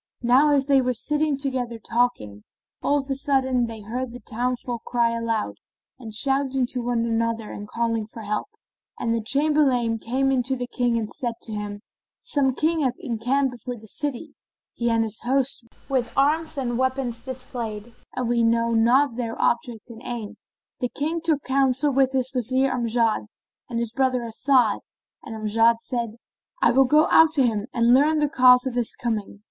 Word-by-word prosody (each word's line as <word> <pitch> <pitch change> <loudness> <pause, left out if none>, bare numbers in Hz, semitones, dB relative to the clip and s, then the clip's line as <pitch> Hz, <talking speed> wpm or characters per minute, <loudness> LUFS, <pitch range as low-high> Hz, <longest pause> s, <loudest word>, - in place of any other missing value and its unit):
Now 255 +5 +5
as 280 -2 +3
they 275 -1 +4
were 250 -1 -1
sitting 300 +3 0
together 255 -4 -3
talking, 225 - -1 0.4
of 285 -1 0
a 275 - -1
sudden 260 -3 +1
they 225 -1 -8
heard 235 +4 -4
the 245 - -8
towns 250 +2 -3
folk 240 -2 -5
crying 235 -1 0
aloud 225 - -2 0.4
and 225 -4 -8
shouting 270 +3 +1
to 250 - -2
one 235 -1 0
another 230 -1 -1
and 205 - -7
calling 230 -1 -1
for 225 0 -10
help; 210 - -2 0.5
and 230 - -1
the 230 - 0
Chamberlain 260 -3 +2
came 265 +5 0
in 260 -2 +2
to 265 +2 -1
the 245 -1 -4
King 245 -1 0
and 220 -2 -3
said 240 -5 -3
to 225 - -4
him, 205 -1 -5 0.4
"Some 280 - 0
King 320 +3 +1
hath 260 -4 0
encamped 255 +2 -1
before 245 0 -7
the 220 - -15
city, 290 +5 -4 0.4
he 235 0 -1
and 230 -1 +2
his 220 -1 -4
host, 260 -1 0 0.2
with 255 -3 0
arms 310 +3 +1
and 240 -3 -2
weapons 260 -3 -1
displayed, 240 -4 -6 0.2
and 250 -2 -2
we 240 0 +1
know 230 0 +2
not 240 +3 +3
their 230 -2 -4
object 235 -1 -1
and 230 0 -11
aim." 235 -4 -5 0.4
The 250 - -1
King 315 +7 -2
took 315 -4 +1
counsel 270 +1 +1
with 265 0 +3
his 260 -1 +4
Wazir 255 +2 +1
Amjad 230 -2 0 0.4
and 235 - -3
his 235 -1 -2
brother 255 -2 +1
As'ad; 235 -1 +2 0.4
and 225 - -8
Amjad 225 +2 +3
said, 235 -4 -3 0.4
"I - - +4
will 265 +2 +5
go 300 +4 +4
out 320 -1 +6
to 275 -5 +4
him 215 -2 -1
and 235 0 +3
learn 295 +4 +4
the 300 -1 +2
cause 250 -2 +5
of 260 - -2
his 240 -2 -1
coming." 215 -4 -3
245 Hz, 185 wpm, -24 LUFS, 230-270 Hz, 0.5 s, out